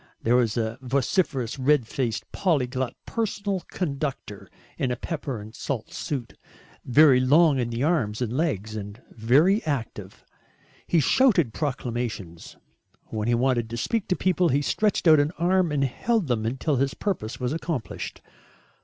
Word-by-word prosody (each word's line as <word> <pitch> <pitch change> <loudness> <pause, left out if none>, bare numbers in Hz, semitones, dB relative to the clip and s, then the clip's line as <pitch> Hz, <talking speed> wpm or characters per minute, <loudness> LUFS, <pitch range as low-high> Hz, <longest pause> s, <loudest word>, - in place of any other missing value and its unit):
There 120 +2 +3
was 120 -3 +2
a 115 +1 -2
vociferous 135 - 0
red 135 -1 +3
faced 115 -1 -3
polyglot 130 -7 0
personal 205 -3 -2
conductor 140 - -4 0.3
in 130 - 0
a 125 - 0
pepper 140 -3 -4
and 105 +1 -10
salt 115 -2 -5
suit, 130 -6 -4 0.5
very 135 0 +6
long 145 +2 +4
in 120 -1 -1
the 120 +2 -2
arms 130 -10 +1
and 120 -2 -2
legs 110 - -1
and 105 +1 -7
very 145 - +3
active. 115 -9 -5 0.6
He 170 - +3
shouted 175 - +3
proclamations. 120 - -4 0.5
When 110 0 -3
he 120 - +3
wanted 120 -2 +1
to 120 - -5
speak 220 - -1
to 180 - +1
people 180 -2 +2
he 140 +2 +1
stretched 210 +2 +1
out 155 -2 +7
an 145 +3 +1
arm 180 -1 +2
and 145 -2 +1
held 215 - 0
them 115 -5 -1
until 135 +4 -1
his 135 +1 0
purpose 165 - -3
was 125 +2 -1
accomplished. 160 -7 -5
130 Hz, 155 wpm, -25 LUFS, 115-160 Hz, 0.6 s, out